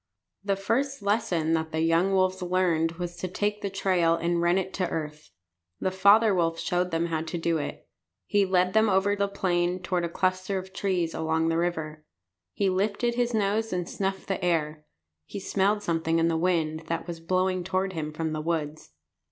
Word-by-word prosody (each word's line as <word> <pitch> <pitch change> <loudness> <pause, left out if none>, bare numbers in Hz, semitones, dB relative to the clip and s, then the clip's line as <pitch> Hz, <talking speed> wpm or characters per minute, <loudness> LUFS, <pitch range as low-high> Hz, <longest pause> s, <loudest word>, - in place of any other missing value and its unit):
The 200 -1 +1
first 245 +5 -1
lesson 200 -7 +1
that 160 -1 -1
the 160 0 -1
young 165 +4 +3
wolves 185 0 +1
learned 175 -3 +1
was 175 0 -5
to 185 - -3
take 205 +3 -2
the 200 - -2
trail 185 -4 +2
and 170 +1 0
run 175 +2 +3
it 190 0 -2
to 180 -2 -1
earth. 150 -1 -5 0.5
The 185 - 0
father 200 +3 +5
wolf 165 -2 +1
showed 175 +2 0
them 165 -1 0
how 165 -2 -1
to 165 +2 -4
do 165 -1 0
it. - - -6 0.4
He 205 -1 +2
led 185 -1 +2
them 220 0 +4
over 195 +1 +2
the 200 0 0
plain 180 -2 0
toward 185 -1 -1
a 170 - -1
cluster 185 +2 -1
of 190 0 -7
trees 180 -4 -1
along 160 0 0
the 165 - +1
river. 160 -3 -3 0.5
He 200 - 0
lifted 205 +6 0
his 240 -1 0
nose 215 +2 0
and 180 -1 -2
snuffed 195 0 -3
the 195 -1 -2
air. 155 -3 -1 0.4
He - - -6
smelled 200 +2 +1
something 165 -1 0
in 165 0 +3
the 165 - 0
wind 160 -2 0
that 165 0 -2
was 170 -2 -6
blowing 185 +2 0
toward 190 +1 -1
him 155 -2 -4
from 160 0 -3
the 155 - -2
woods. 155 - -3
180 Hz, 195 wpm, -27 LUFS, 165-195 Hz, 0.5 s, father